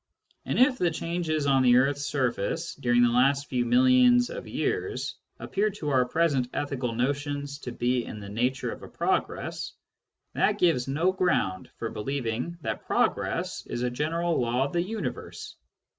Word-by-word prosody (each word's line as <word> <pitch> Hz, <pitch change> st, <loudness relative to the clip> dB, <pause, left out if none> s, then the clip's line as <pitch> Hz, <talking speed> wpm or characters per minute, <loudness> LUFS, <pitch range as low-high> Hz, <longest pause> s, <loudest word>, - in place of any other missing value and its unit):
And -, -, -1 dB
if 255 Hz, 0 st, +4 dB
the 175 Hz, -, +3 dB
changes 165 Hz, -2 st, -2 dB
on 135 Hz, -1 st, +4 dB
the 125 Hz, -1 st, +5 dB
earth's 140 Hz, +2 st, +2 dB
surface 130 Hz, +4 st, -1 dB
during 120 Hz, -6 st, +2 dB
the 120 Hz, -, +4 dB
last 135 Hz, +3 st, +2 dB
few 125 Hz, -2 st, 0 dB
millions 250 Hz, -1 st, +5 dB
of -, -, -7 dB
years -, -, -2 dB, 0.2 s
appear 210 Hz, +2 st, 0 dB
to 190 Hz, -7 st, -5 dB
our 130 Hz, -2 st, +3 dB
present 140 Hz, -4 st, +1 dB
ethical 130 Hz, -5 st, -2 dB
notions 145 Hz, +2 st, -2 dB
to 125 Hz, -, -6 dB
be 120 Hz, +1 st, 0 dB
in 105 Hz, -, -7 dB
the 100 Hz, -, -8 dB
nature 125 Hz, +6 st, -1 dB
of -, -, -8 dB
a -, -, -9 dB
progress, -, -, -2 dB, 0.6 s
that -, -, +2 dB
gives 160 Hz, -8 st, +2 dB
no 160 Hz, +7 st, +2 dB
ground 140 Hz, -, 0 dB
for 115 Hz, -, -4 dB
believing 125 Hz, +6 st, -3 dB
that -, -, -4 dB
progress -, -, 0 dB
is 120 Hz, -, -3 dB
a 125 Hz, -, 0 dB
general 165 Hz, +4 st, 0 dB
law 120 Hz, +2 st, +1 dB
of 140 Hz, -, -6 dB
the 170 Hz, -, +2 dB
universe. 215 Hz, +5 st, -5 dB
140 Hz, 165 wpm, -27 LUFS, 125-170 Hz, 0.6 s, the